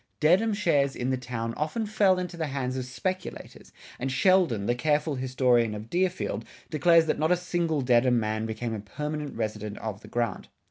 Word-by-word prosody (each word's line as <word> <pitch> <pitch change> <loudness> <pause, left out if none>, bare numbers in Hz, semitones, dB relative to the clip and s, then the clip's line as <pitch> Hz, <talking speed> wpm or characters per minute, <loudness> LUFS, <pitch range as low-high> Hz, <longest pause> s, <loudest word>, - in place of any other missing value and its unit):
Dedham 185 +9 +4
shares 145 -9 +2
in 125 +2 -1
the - - +2
town 120 -2 -4
often 155 - -2
fell 205 -3 +3
into 180 -1 -4
the 160 -2 -2
hands 135 -2 -3
of 130 -1 -3
speculators, 185 +9 -5 0.3
and 135 +2 -2
Sheldon, 155 - +3
the 120 - +2
careful 150 +4 +1
historian 125 -4 +2
of 105 +2 -9
Deerfield, 185 +1 -1 0.3
declares 165 +1 +5
that 160 - -1
not 155 +1 +2
a 180 - +4
single 170 -4 -1
Dedham 125 -1 +3
man 110 0 -2
became 115 +1 -3
a 110 - -3
permanent 150 +8 -5
resident 105 -2 -3
of 105 -2 -5
the - - -13
grant. 120 -5 -2
135 Hz, 185 wpm, -27 LUFS, 115-170 Hz, 0.3 s, declares